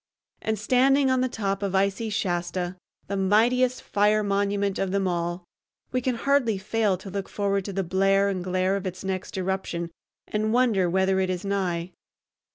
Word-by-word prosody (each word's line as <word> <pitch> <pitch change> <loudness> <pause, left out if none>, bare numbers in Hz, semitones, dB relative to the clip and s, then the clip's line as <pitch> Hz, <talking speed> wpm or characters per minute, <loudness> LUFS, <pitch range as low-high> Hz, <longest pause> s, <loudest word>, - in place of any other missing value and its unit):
And, 220 0 -1
standing 265 +5 +3
on 260 -1 +2
the 255 - +1
top 195 -4 -2
of 195 -1 -1
icy 200 +3 +1
Shasta, 175 -2 -2 0.3
the 200 - -3
mightiest 235 +6 +2
fire 210 +1 +2
monument 200 0 0
of 195 - 0
them 195 0 0
all, 175 0 -2 0.5
we 255 - 0
can 250 0 0
hardly 250 -4 +2
fail 205 0 0
to 190 +1 -10
look 195 0 -4
forward 200 -2 -1
to 200 - -5
the 195 +1 -1
blare 195 +2 +2
and 190 -3 -2
glare 185 +1 +1
of 195 -1 -3
its 185 +1 -6
next 190 0 -4
eruption 185 -2 -2 0.4
and 215 +1 -1
wonder 225 -8 +3
whether 190 +1 +2
it 190 -1 0
is 180 +1 -3
nigh. 185 -3 -1
195 Hz, 175 wpm, -25 LUFS, 185-215 Hz, 0.5 s, standing